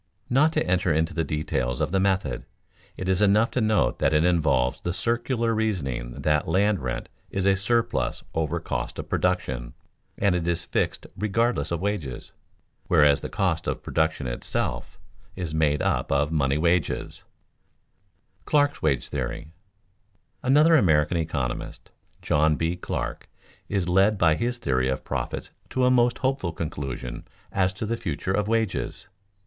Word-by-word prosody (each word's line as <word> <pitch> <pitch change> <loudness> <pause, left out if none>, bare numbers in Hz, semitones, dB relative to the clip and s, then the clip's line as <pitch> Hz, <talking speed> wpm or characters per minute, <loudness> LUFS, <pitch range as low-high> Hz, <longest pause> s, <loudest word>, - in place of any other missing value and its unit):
Not 150 +5 +4
to - - +1
enter 90 -1 +1
into 80 +3 +1
the 85 - 0
details 65 -5 -2
of - - 0
the 95 - +2
method, 95 -10 0 0.5
it 95 - -4
is 95 +1 +2
enough 105 +3 +4
to 130 - 0
note 110 - +2
that - - +2
it 75 +2 +4
involves 70 -8 +2
the 85 - -2
circular 120 +1 0
reasoning 70 - -2
that 75 -1 +2
land 100 +4 +2
rent 60 -3 -4 0.2
is 95 -1 -2
a 100 0 +5
surplus 115 +4 0
over 80 +1 -1
cost 60 -6 -4
of - - -5
production, - - -1 0.4
and 100 -2 +2
is 85 0 -1
fixed - - -1
regardless 115 +5 0
of 85 -1 -2
wages, 90 -11 -3 0.6
whereas 75 -2 +5
the - - -5
cost - - -1
of - - -2
production 80 -3 0
itself - - -3 0.4
is 90 -4 -4
made 75 -2 +2
up - - 0
of 75 +2 +2
money 70 -3 +1
wages. 85 0 0
[Sidenote: - - -27 1.2
Clark's 145 -1 +2
wage 70 -5 +1
theory] 70 +3 -4 0.9
Another 150 +6 +5
American 85 - +3
economist, 70 -7 -3 0.3
John 75 +1 +3
B. 80 +3 -1
Clark, 90 - -4 0.4
is 95 -3 0
led 95 +4 +4
by 85 -4 +4
his 120 +9 -1
theory 65 - 0
of 65 - -2
profits - - -4 0.2
to 130 -1 +1
a 125 - +4
most 120 -1 +3
hopeful 130 -10 -1
conclusion 70 -6 -5 0.3
as 95 -1 +2
to 105 - -4
the 115 +2 -1
future 95 -3 -3
of 105 +1 0
wages. 110 -3 -1
85 Hz, 155 wpm, -25 LUFS, 75-105 Hz, 1.2 s, a